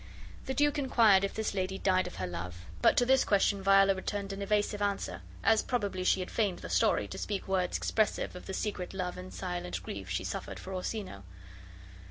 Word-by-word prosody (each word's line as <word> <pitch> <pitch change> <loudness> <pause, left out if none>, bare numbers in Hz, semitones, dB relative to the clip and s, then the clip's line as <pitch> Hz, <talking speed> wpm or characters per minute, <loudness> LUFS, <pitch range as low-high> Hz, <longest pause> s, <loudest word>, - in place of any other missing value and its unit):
The 265 - -2
duke 290 0 +2
inquired 225 -8 +5
if 200 - -2
this 220 -1 -1
lady 190 0 -2
died 185 -1 +2
of - - -8
her 95 - -3
love, 90 0 -6 0.2
but - - +5
to 245 - +5
this 265 +1 +4
question 200 0 +2
Viola 195 0 +5
returned 195 +1 -4
an 195 - -6
evasive 205 0 0
answer; 200 -1 -2 0.2
as 220 +1 +5
probably 205 -7 -2
she 185 - +3
had 180 - -6
feigned 205 -6 0
the - - -8
story, - - +2
to - - -7
speak 200 -2 -3
words 185 -2 0
expressive 215 -4 0
of 180 - -9
the 190 - -4
secret 190 -3 -3
love 180 -2 -2
and 185 +1 -8
silent 175 - -4
grief 95 0 -6
she 90 - -1
suffered - - -5
for 190 - -7
Orsino. 185 - -4
195 Hz, 205 wpm, -31 LUFS, 180-210 Hz, 0.2 s, inquired